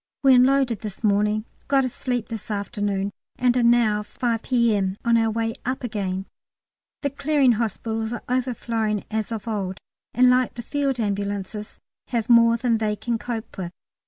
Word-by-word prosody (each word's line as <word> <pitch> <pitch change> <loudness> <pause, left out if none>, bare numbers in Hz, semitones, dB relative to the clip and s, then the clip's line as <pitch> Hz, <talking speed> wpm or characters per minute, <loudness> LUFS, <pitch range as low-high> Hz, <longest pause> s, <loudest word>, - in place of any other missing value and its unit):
We 270 -1 +7
unloaded 255 -3 +4
this 210 0 -7
morning, 210 +1 +2 0.2
got 270 -1 +3
a - - -1
sleep 245 -2 -3
this 225 -2 -6
afternoon, 205 -1 -2 0.2
and 250 -1 +2
are 250 - +3
now, 235 -3 +4
5 230 +2 -2
P.M., 215 -7 +1
on 235 0 +4
our 225 -1 +3
way 225 +1 -1
up 255 +2 -3
again. 195 -5 -2 0.8
The 280 - 0
Clearing 280 -2 +3
Hospitals 225 0 -2
are 240 - -5
overflowing 230 -4 -1
as 220 0 -2
of 225 -1 -5
old, 195 -4 -2 0.4
and 255 +1 +6
like 250 0 +3
the 240 - -6
Field 275 0 -1
Ambulances 205 0 -3 0.3
have 235 -2 -2
more 230 0 +6
than 230 -2 +1
they 215 -1 0
can 235 +1 -2
cope 225 -4 -5
with. 175 -2 -3
225 Hz, 165 wpm, -24 LUFS, 210-245 Hz, 0.8 s, We